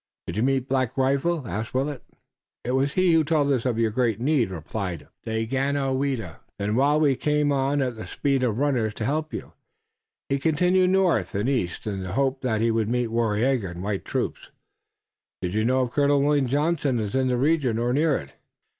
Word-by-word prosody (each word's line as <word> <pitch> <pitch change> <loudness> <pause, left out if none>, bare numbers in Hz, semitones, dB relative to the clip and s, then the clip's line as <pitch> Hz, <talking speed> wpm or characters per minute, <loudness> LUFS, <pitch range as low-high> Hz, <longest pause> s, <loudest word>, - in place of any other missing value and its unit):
"Did 85 - -5
you 110 - 0
meet 135 0 +1
Black 130 -2 -1
Rifle?" 140 +2 +1
asked 110 +4 -4
Willet. 135 0 -1 0.6
"It 125 - -2
was 135 +2 +1
he 185 -2 +3
who 160 -1 +4
told 150 -2 +1
us 130 -2 +1
of 120 -3 0
your 115 -1 +1
great 115 -2 0
need," 130 -4 +2
replied 85 -2 -5 0.2
Daganoweda. 130 - -1 0.2
"Then 105 +2 -1
while 145 +4 +3
we 145 -3 +3
came 150 +1 +1
on 140 +1 +1
at 125 -2 -2
the 110 - -8
speed 140 -2 0
of 115 -4 0
runners 125 -6 0
to 110 - -3
help 155 +4 -1
you, - - -7 0.7
he 140 - 0
continued 180 +5 +3
north 180 - +2
and 105 +4 0
east 120 -11 -1
in 100 -3 -3
the 95 0 -5
hope 135 +1 0
that 110 -4 0
he 115 0 +2
would 110 -1 0
meet 120 -1 0
Waraiyageh 115 0 +1
and 90 +1 -7
white 100 -1 -2
troops." - - -3 0.9
"Do 90 - 0
you 110 +4 0
know 130 +3 +2
if 120 - -4
Colonel 145 0 +3
William 145 -2 +2
Johnson 145 -2 +1
is 105 -2 -3
in 130 -1 +1
this 125 -1 +1
region 135 -4 +1
or 120 +1 0
near 150 +1 +2
it?" 70 -1 -10
130 Hz, 200 wpm, -25 LUFS, 110-145 Hz, 0.9 s, who